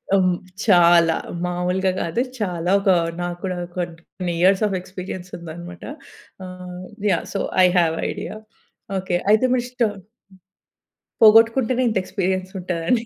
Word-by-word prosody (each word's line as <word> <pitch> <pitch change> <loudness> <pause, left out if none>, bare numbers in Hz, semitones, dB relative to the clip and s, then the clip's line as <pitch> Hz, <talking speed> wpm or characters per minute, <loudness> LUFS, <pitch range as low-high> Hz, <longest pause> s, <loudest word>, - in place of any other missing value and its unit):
ఆహ్, - - +4
హ్మ్, 180 -1 +2 0.3
చాలా, 170 -4 +5 0.3
మాములుగా 180 +2 0
గాదు 200 +9 -1 0.2
చాలా 175 -4 -2
ఒక 195 - 0 0.3
నాకు 175 0 -4
కూడా 185 -1 -2 0.2
కొన్ని 175 +1 -5
ఇయర్స్ 195 +3 +4
ఆఫ్ 195 - -2
ఎక్స్పీరియన్స్ 185 0 -8
ఉందనమాట. 170 +1 -9 0.6
ఆహ్, 180 0 -9 0.3
yeah! 170 - 0
So - - -1 0.2
I - - +8
have 165 -1 +1
idea - - -6 0.6
okay. 185 -1 -2 0.2
అయితే 220 +4 +4
మిస్టోన్ 240 -5 -2 1.2
పోగొట్టుకుంటేనే 230 +3 +5
ఇంత 215 - -1
ఎక్స్పీరియన్స్ 185 0 -2
ఉంటదని 180 +7 -1
185 Hz, 125 wpm, -22 LUFS, 175-205 Hz, 1.2 s, I